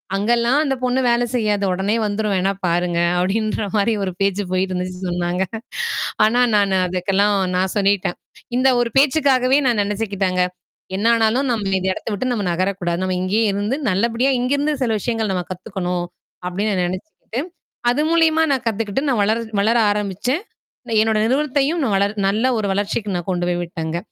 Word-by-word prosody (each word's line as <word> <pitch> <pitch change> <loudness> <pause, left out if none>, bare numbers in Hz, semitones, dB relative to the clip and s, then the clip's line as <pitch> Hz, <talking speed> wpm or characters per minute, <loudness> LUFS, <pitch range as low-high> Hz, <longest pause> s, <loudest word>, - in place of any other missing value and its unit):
"அங்க 200 +3 -1
எல்லாம் 240 +4 +2
அந்தப் 270 -4 -2
பொண்ணு 250 +1 +1
வேலை 240 0 +2
செய்யாது. 210 -4 +1
ஒடனே 195 +4 0
வந்துரும். 210 0 -1
வேணா 190 +1 +1
பாருங்க" 175 0 0 0.2
அப்படீன்ற 215 +4 0
மாரி 210 +3 +2
ஒரு 190 - -2
பேச்சு 200 +1 +1
போயிட்டுருந்துச்சுன்னு 185 0 -2
சொன்னாங்க. 175 +1 -1 0.8
ஆனா 240 +3 +2 0.2
நானு 200 -2 +2
அதுக்கெல்லாம் 195 +3 +1 0.2
நான் 185 0 0
சொல்லிட்டேன் 200 -3 +1 0.4
இந்த 255 +1 +4
ஒரு 240 - +1
பேச்சுக்காகவே 270 -2 +4
நான் 235 -4 +2
நெனைச்சுக்கிட்டேங்க, 200 -3 -1 0.5
"என்னா 220 +4 +2
ஆனாலும் 230 +5 +2
நாம 210 -5 -1
இந்த 190 +1 -2
இடத்தை 205 - -6
விட்டு, 255 +6 -2
நம்ம 215 -4 -2
நகரக் 185 +3 -1
கூடாது. 175 0 -1
நம்ம 185 -1 -1
இங்கே 200 +5 +1
இருந்து 205 +6 -1
நல்லபடியா, 230 +7 +1
இங்கிருந்து 285 +4 +1
சில 235 -3 +1
விஷயங்கள் 225 -1 -1
நம்ம 180 -1 -2
கத்துக்கணும்." 180 -2 -3 0.4
அப்படீன்னு 200 +4 -1
நா 180 - +1
நெனைச்சுக்கிட்டு, 215 - -6 0.5
அது 250 +5 +1
மூலியமா 325 -1 +4
நான் 265 - -1
கத்துக்கிட்டு, 220 +4 -2
நான் 250 -6 +1
வளர் 220 +3 +1 0.2
வளர 220 +4 +2 0.2
ஆரம்பிச்சேன். 210 - -2 0.4
இல்ல, 235 - -4
என்னோட 220 -1 +1
நிறுவனத்தையும் 285 +5 +1
நான் 215 -6 +1
வளர் 200 +2 0
நல்ல 215 +5 0
ஒரு 205 - -1
வளர்ச்சிக்கு 205 +1 -2
நான் 175 +2 -5
கொண்டு 175 -1 -1
போய் 175 0 -1
விட்டேங்க. 165 -1 -4
205 Hz, 165 wpm, -20 LUFS, 185-240 Hz, 0.8 s, இந்த